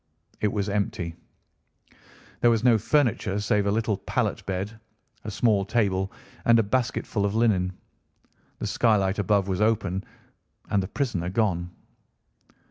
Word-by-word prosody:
It 105 - +1
was 100 -2 -1
empty. 100 -4 -2 1.3
There 120 - +5
was 115 -1 +2
no 120 -3 +5
furniture 115 -5 +1
save 105 0 +1
a - - +2
little 110 -1 0
pallet - - -2
bed, 100 +4 -3 0.5
a - - -3
small 105 -1 +2
table, 95 -2 0 0.3
and 115 0 +5
a 115 - +4
basketful 110 -1 -1
of 100 +1 0
linen. 100 -6 +2 0.9
The - - -4
skylight 105 -4 +2
above 100 -1 +2
was 95 +1 -1
open, 100 -4 +1 0.7
and 100 - +3
the 95 - -4
prisoner 100 - -2
gone. 90 -4 0
105 Hz, 135 wpm, -26 LUFS, 95-115 Hz, 1.3 s, There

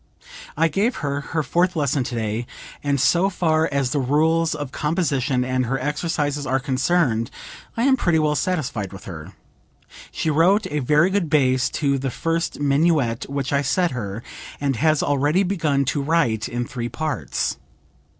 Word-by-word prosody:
I 165 +1 +4
gave 205 +9 0
her 140 0 -1
her 160 +2 -2
fourth 180 +4 +1
lesson 145 -3 +1
today, 115 -1 -3 0.4
and 140 -1 +1
so 175 +8 +3
far 160 -4 +1
as 140 -3 0
the 145 - +1
rules 160 +5 +2
of 145 -3 -5
composition 145 -5 0
and 130 -1 0
her 135 +3 0
exercises 150 0 -1
are 135 +1 +1
concerned 135 -3 +1 0.5
I 230 - +1
am 270 0 +5
pretty 175 -8 +2
well 155 -1 +2
satisfied 140 - -2
with 95 - -10
her. 85 +1 -8 0.8
She 160 - -1
wrote 185 +8 +3
a 150 - 0
very 150 +7 +3
good 190 -5 0
bass 130 -4 +3
to 140 -1 +2
the 135 0 -2
first 165 +6 -2
minuet 140 -4 +1
which 140 0 -2
I 140 - +3
set 165 +5 +1
her, 110 -2 -5 0.4
and 140 -2 0
has 155 +3 +2
already 145 +6 +2
begun 160 -8 0
to 145 - -1
write 135 -8 +1
in 120 0 -2
three 120 -1 -5
parts. 155 -4 -2
145 Hz, 165 wpm, -22 LUFS, 130-165 Hz, 0.8 s, am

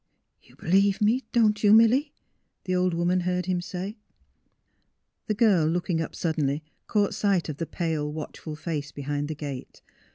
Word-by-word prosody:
'^ - - -24
You - - -19
believe 195 +3 +2
me, 225 +5 +2
don't 215 -3 +2
you, 205 - +6
Milly? 240 +7 +5 0.3
" - - -50
the 185 - -1
old 180 -1 +1
woman 175 +2 +1
heard 180 0 -1
him 180 -1 0
say. 190 +5 -6 1.3
The 215 - 0
girl 200 -8 +4
looking 175 0 0
up 160 - -5
suddenly 155 -3 -1 0.2
caught 205 -2 +1
sight 195 -5 +1
of 145 - -4
the 165 - -3
pale, 160 -4 -2
watchful 155 0 -7
face 150 -2 -4
behind 145 +1 -3
the 155 - -4
gate. 140 -3 -7
180 Hz, 170 wpm, -26 LUFS, 155-205 Hz, 1.3 s, you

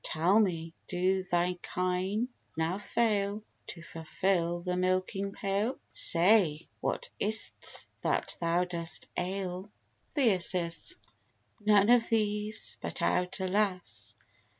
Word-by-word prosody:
Tell 175 +7 +3
me, 165 -6 0
do 185 +1 +1
thy 180 0 0
kine 185 +6 -1 0.3
now 165 +4 0
fail 210 -2 0 0.2
To 170 - -7
fulfil 170 +1 -1
the 180 0 -2
milking 185 +2 0
pail? 200 +5 -1
Say, 170 -3 +4
what - - -2
is't 215 +2 0 0.2
that - - +1
thou 170 +1 +2
dost 170 -2 -3
ail? 185 +1 -3 0.5
THYR. 185 - +2 1.0
None 205 0 +6
of 240 -1 +5
these; 210 -1 0
but - - -4
out, 180 +2 +1
alas! 190 0 -1
185 Hz, 105 wpm, -30 LUFS, 175-205 Hz, 1.0 s, None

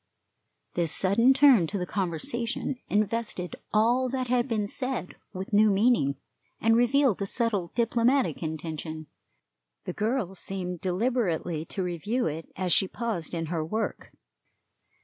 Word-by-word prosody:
This 170 -3 +1
sudden 225 +7 +4
turn 265 - +6
to 200 - -3
the 180 - -2
conversation 215 - -2
invested 210 -3 -1 0.2
all 240 +4 +3
that 255 -1 -2
had 245 0 +2
been 220 -4 0
said 255 -1 -4 0.2
with 190 +2 -7
new 215 +1 +6
meaning, 200 - +3 0.4
and 225 +1 +3
revealed 245 -2 +3
a 200 - 0
subtle 210 -6 +1
diplomatic 240 +3 +2
intention. 155 0 -5 0.8
The - - -5
girl 215 -3 -1
seemed 180 -2 -4
deliberately 180 -5 -1
to 190 - -4
review 185 +8 -1
it 160 +1 -4
as 180 -2 +1
she 190 - +4
paused 205 -7 -4
in 165 -1 -2
her 160 -2 -1
work. 215 +8 -3
205 Hz, 135 wpm, -27 LUFS, 175-235 Hz, 0.8 s, turn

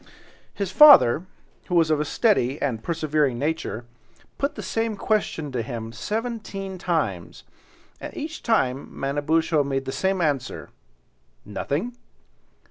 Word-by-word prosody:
His 200 -2 -3
father, 185 - +8 0.4
who 180 - -1
was 165 -2 +4
of 155 - +2
a 150 - 0
steady 145 - +1
and 120 -6 -2
persevering 155 -4 0
nature, 145 -4 -3 0.5
put 280 +1 -1
the - - -6
same 225 -1 -1
question 195 -9 -1
to 125 -2 -2
him 115 -1 -6
seventeen 205 - -4
times, 145 - -2 0.6
and - - -7
each 315 +1 -5
time 135 - 0
Manabozho 145 +3 +1
made 135 -1 -2
the - - -3
same 190 +8 0
answer—"Nothing." 140 - -5
155 Hz, 125 wpm, -24 LUFS, 135-195 Hz, 0.6 s, father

